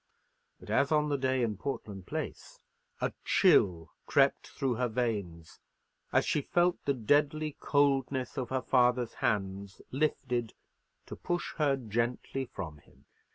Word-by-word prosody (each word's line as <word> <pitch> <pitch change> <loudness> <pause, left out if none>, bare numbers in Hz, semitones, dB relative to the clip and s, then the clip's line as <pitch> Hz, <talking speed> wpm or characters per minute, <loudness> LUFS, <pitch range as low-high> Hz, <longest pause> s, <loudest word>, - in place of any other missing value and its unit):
But, - - -9
as 140 - +2
on 150 -1 +3
the 145 - +1
day 130 -1 +1
in 110 -4 -1
Portland 100 -7 -5
Place, - - -5 0.4
a - - 0
chill 85 -4 +3 0.2
crept - - +3
through 135 -2 -1
her 125 +2 0
veins, 105 -9 -3 0.5
as - - +3
she 150 - +1
felt 175 +4 +1
the 140 - +1
deadly 145 +5 +1
coldness 135 -3 +1
of 130 -4 -3
her 130 -1 -1
father's 125 -2 +2
hands 95 -1 -1
lifted 125 -5 -1 0.5
to - - -8
push 175 0 -3
her 145 -3 +3
gently 120 +3 -2
from 80 -10 -7
him. - - -25
125 Hz, 140 wpm, -31 LUFS, 105-140 Hz, 0.5 s, on